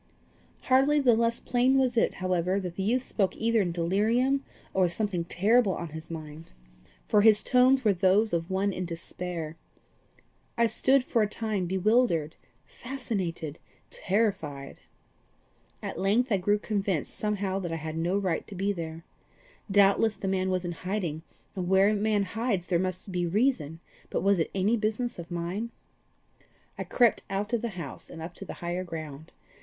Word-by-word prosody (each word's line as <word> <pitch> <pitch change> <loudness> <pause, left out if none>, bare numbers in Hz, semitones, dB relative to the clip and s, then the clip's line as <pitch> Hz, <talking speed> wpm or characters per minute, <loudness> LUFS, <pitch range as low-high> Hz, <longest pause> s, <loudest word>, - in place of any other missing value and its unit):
Hardly 270 +3 +4
the 255 -4 +5
less 230 +1 +1
plain 255 +2 +2
was 255 -2 +2
it, 230 - +2
however, 185 +1 0
that 180 -3 -5
the 195 - -3
youth 240 +6 +1
spoke 195 -7 -1
either 230 -1 +2
in 180 -3 -1
delirium 220 +11 +1 0.3
or 190 -1 +3
with 175 - -2
something 195 -5 -2
terrible 205 +3 +3
on 170 - -5
his 160 +1 -9
mind, 155 -1 -8 0.6
for 210 - +4
his 215 -1 +5
tones 255 0 +4
were 210 - +5
those 195 +4 +3
of 165 +1 -1
one 195 +1 0
in 185 - -3
despair. 170 -1 -5 1.0
I 235 - +4
stood 260 +4 +3
for 235 -2 +1
a 210 - +3
time 210 -4 -2
bewildered, 190 -4 +2 0.3
fascinated, 190 - -4 0.3
terrified. 185 -10 -2 1.0
At - - -5
length 225 +6 +2
I 200 - +4
grew 205 +3 +2
convinced 200 -7 -2
somehow 200 -2 -1
that 175 -3 -4
I - - -1
had 160 0 -5
no 175 +4 0
right 185 -5 -1
to 200 - -8
be 195 +2 0
there. 165 -2 -6 0.7
Doubtless 200 +2 +4
the 195 - -5
man 190 0 0
was 185 -1 -1
in 175 - -2
hiding, 175 -3 -3 0.3
and 180 -2 -3
where 190 +1 +5
a - - +2
man 210 0 +1
hides 205 -2 -2
there 175 -2 +1
must 185 +1 -3
he 175 -1 0
reason, 170 - 0 0.3
but - - -2
was 200 -2 +3
it 165 - 0
any 200 +4 +2
business 220 +1 -2
of 170 - -8
mine? 175 +6 -3 1.1
I - - -5
crept 240 -3 +3
out 205 +4 -3
of 235 - +1
the 235 - -2
house, 150 -7 -6
and - - -9
up 165 +2 -7
to 195 - -9
the - - -7
higher 175 +2 -2
ground. 155 -3 -8
195 Hz, 175 wpm, -28 LUFS, 170-220 Hz, 1.1 s, the